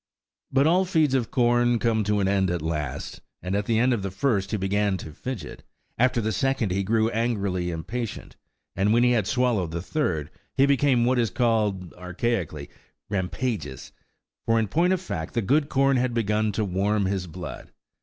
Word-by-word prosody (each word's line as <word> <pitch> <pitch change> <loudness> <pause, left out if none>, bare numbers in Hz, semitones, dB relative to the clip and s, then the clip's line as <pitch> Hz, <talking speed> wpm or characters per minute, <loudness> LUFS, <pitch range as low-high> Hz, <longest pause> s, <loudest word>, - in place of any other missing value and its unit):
But 135 +1 +3
all 175 +4 +4
feeds 160 -7 +2
of 125 -4 +1
corn 120 -1 +3
come 115 -2 +1
to 105 0 +1
an 95 - +1
end 95 -1 +2
at 85 -3 -2
last; 75 -4 -4 0.2
and 90 +2 -2
at 100 0 -1
the 115 - +2
end 125 +3 +3
of 115 - -1
the 95 - -3
first 100 -1 0
he 110 - -1
began 100 0 0
to 80 - -8
fidget, 125 - -6 0.3
after 125 0 +2
the 110 -1 -1
second 135 -5 0
he 95 +2 0
grew 110 +3 +1
angrily 100 -6 -1
impatient, 110 +8 -5 0.4
and 100 +3 +2
when 120 +1 +4
he 125 - +4
had 110 -6 +1
swallowed 125 -9 +1
the 85 +1 -4
third, 90 - -2 0.3
he 135 - +6
became 140 -3 +3
what 125 0 +2
is 115 -2 +2
called 105 -5 0
(archaically) 90 -4 -3 0.4
rampageous, 100 - -3 0.6
for 115 0 +3
in 110 - 0
point 170 - +2
of 190 - +2
fact 95 - -5
the 115 - +2
good 145 +8 +2
corn 135 0 +3
had 125 -1 0
begun 110 -1 +1
to 110 +1 0
warm 100 +2 0
his 95 -1 -2
blood. 90 +2 -8
110 Hz, 190 wpm, -25 LUFS, 95-125 Hz, 0.6 s, he